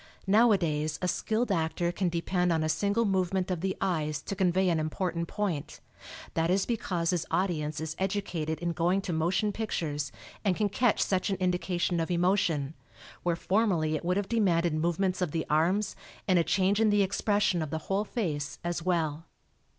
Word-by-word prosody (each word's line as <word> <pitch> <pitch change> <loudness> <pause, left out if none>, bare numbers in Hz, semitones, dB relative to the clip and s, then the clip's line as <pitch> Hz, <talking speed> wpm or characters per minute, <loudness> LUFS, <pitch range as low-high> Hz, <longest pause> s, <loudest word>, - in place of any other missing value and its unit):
Nowadays 185 -8 +3
a - - +2
skilled 220 +5 0
actor 170 0 0
can 180 +1 0
depend 180 +1 0
on 160 -1 +1
a 155 - 0
single 200 +8 +1
movement 190 -1 0
of 175 -3 -2
the 190 0 -1
eyes 155 -4 -1
to 200 - -4
convey 185 0 +2
an 165 -2 +2
important 170 +2 -2
point; 185 -9 -3 0.5
that 165 0 +1
is 190 +2 +2
because 180 -7 -1
his 175 -3 -1
audience 155 -6 -1
is 160 0 -4
educated 180 -5 -2
in 175 0 0
going 175 +4 +1
to 185 -3 -3
motion 175 +6 +1
pictures, 150 -10 -3 0.3
and 195 -4 +2
can 210 +1 +1
catch 235 +3 +2
such 190 0 0
an 195 - +1
indication 180 -1 0
of 165 - -1
emotion, 175 -5 +1 0.5
where 175 -1 +1
formerly 175 -5 +1
it 150 - -4
would 180 +2 +1
have 200 -1 -1
demanded 175 -7 +2
movements 175 +4 0
of 180 - +1
the 160 -1 -1
arms 180 +7 +2 0.3
and 185 -3 +4
a - - +3
change 195 +4 +2
in 220 - +4
the 205 -1 +4
expression 200 -2 +1
of 155 - -3
the 160 - -2
whole 195 +2 0
face 150 - -3
as 175 0 -2
well. 165 -3 -1
180 Hz, 180 wpm, -29 LUFS, 160-195 Hz, 0.5 s, and